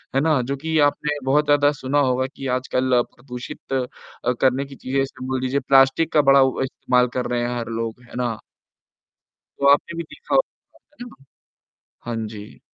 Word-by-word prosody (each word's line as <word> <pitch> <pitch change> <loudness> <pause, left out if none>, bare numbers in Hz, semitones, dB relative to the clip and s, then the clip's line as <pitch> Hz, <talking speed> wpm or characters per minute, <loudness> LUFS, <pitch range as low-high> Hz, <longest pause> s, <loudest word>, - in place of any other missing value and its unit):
है 135 - +3
ना? 155 -3 +2
जो 135 +3 -3
कि 160 +3 -2
आपने 150 0 -3
बहुत 145 +3 +3
ज़्यादा 145 0 +4
सुना 135 +3 +1
होगा 130 -1 +1
कि 135 - -6
आजकल 130 -1 +1
प्रदूषित 125 +1 -8
अ, 130 -2 0 0.5
करने 130 +1 +2
की 135 0 -12
चीज़ें 135 +1 -2
जैसे 135 -1 -3
बोल 130 -1 -2
दीजिए 130 +2 0
प्लास्टिक 135 +4 +4
का 150 - +6
बड़ा 140 0 +7 0.2
इस्तेमाल 125 -1 +1
कर 125 - -1
रहे 120 0 0
हैं 120 0 -2
हर 115 - -5
लोग, 115 +1 -4
है 125 - -14
ना? 120 -3 -1 1.2
तो 140 - +3
आपने 165 +4 -1
भी 170 - -2
देखा 475 - -5
होगा, - - 0 0.4
है - - -8
ना? - - -16 0.9
हाँ 120 0 -3
जी। 105 -1 -11
130 Hz, 185 wpm, -22 LUFS, 125-145 Hz, 1.2 s, बड़ा